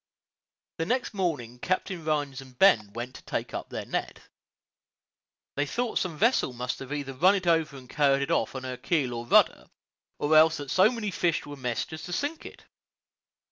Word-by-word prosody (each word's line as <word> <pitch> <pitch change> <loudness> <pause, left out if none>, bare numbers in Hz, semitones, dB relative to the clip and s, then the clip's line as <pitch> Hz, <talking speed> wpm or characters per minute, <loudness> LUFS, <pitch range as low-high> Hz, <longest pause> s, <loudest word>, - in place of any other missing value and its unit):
The 165 - -1
next 250 0 0
morning 150 - -2
Captain 185 +2 -2
Rhines 145 -3 -1
and 130 -2 -15
Ben 110 - +5
went 120 +2 -5
to - - -11
take - - -4
up - - -5
their - - -5
net. - - -4 1.3
They 145 +1 0
thought 240 - -1
some 170 -5 -3
vessel 230 - +2
must 125 +2 -4
either 140 0 -4
have 130 +2 -14
run 190 +3 +6
over 160 -3 +2
it - - -8
and 125 - -15
carried 140 0 +2
it 140 - -3
off - - 0
on 130 - -5
her 130 -1 -5
keel 140 -2 0
or 120 0 -5
rudder, - - +4 0.5
or 150 +2 +2
else 155 +1 +6
that 145 -2 -6
so 190 +7 +5
many 225 -4 -3
fish 175 -3 0
were 145 - -8
meshed 125 +1 -3
as 155 - -6
to 175 - -6
sink 290 - -3
it. - - -14
145 Hz, 195 wpm, -27 LUFS, 130-180 Hz, 1.3 s, run